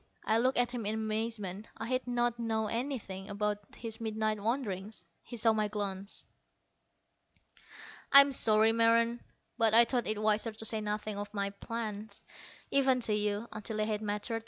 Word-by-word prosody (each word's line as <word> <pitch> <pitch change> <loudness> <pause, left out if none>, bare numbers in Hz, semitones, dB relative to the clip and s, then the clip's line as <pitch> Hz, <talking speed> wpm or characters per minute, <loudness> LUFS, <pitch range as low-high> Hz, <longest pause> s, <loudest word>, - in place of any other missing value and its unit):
I 220 +1 +2
looked 255 +2 +1
at 245 0 +2
him 245 -2 -4
in 215 - 0
amazement. 215 -2 -3
I 225 - -5
had 255 +1 -2
not 240 -1 0
known 220 -2 -1
anything 230 -6 -4
about 205 0 -1 0.2
his 230 -1 -6
midnight 215 -1 -1
wanderings. 215 -4 -3 0.2
He 240 - -9
saw 225 0 +4
my 215 -1 0
glance. 200 -1 -4 1.9
"I'm 280 0 +9
sorry, 220 -3 +5
Meron, 230 +1 +3 0.4
but 225 -1 +4
I 235 +1 +9
thought 240 0 -1
it 215 -1 +1
wiser 215 +1 +1
to 220 +1 -9
say 220 0 -1
nothing 210 0 -3
of 205 0 -6
my 200 0 -1
plans, 215 0 -6 0.5
even 265 -2 +3
to 220 - +2
you, 210 +1 -1
until 215 +1 -4
they 215 - +1
had 215 -1 -2
matured. 210 +2 -2
220 Hz, 165 wpm, -31 LUFS, 210-230 Hz, 1.9 s, I'm